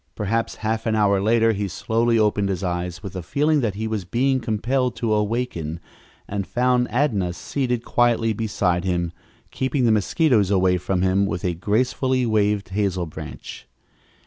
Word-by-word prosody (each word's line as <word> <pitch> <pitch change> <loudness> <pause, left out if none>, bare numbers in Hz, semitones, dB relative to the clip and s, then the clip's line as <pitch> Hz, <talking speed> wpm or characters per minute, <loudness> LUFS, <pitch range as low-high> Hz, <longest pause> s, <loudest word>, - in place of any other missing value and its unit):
Perhaps 115 +2 -1
half 110 +1 -1
an 110 - +1
hour 100 -2 +3
later 115 +2 +3
he 100 -1 -2
slowly 115 +5 0
opened 105 -2 +2
his 95 0 -2
eyes 90 0 -3
with 100 - -6
the 90 - -4
feeling 150 - +1
that 110 -5 -1
he 110 +2 -3
was 110 -3 -2
being 130 +8 +1
compelled 125 +3 -1
to 115 -2 0
awaken, 105 -7 -2 0.5
and 100 -2 -3
found 125 0 +1
Adnah 105 -9 0
seated 125 +5 -2
quietly 115 -2 +2
beside 100 -5 0
him, 85 -2 -1 0.4
keeping 130 -1 0
the 115 - +4
mosquitoes 110 - +2
away 95 -2 +3
from 90 +1 -1
him 95 +1 +2
with 90 - -4
a 90 - +1
gracefully 125 +7 0
waved 105 -3 +1
hazel 95 -2 -1
branch. 80 -1 -9
105 Hz, 165 wpm, -22 LUFS, 95-120 Hz, 0.5 s, the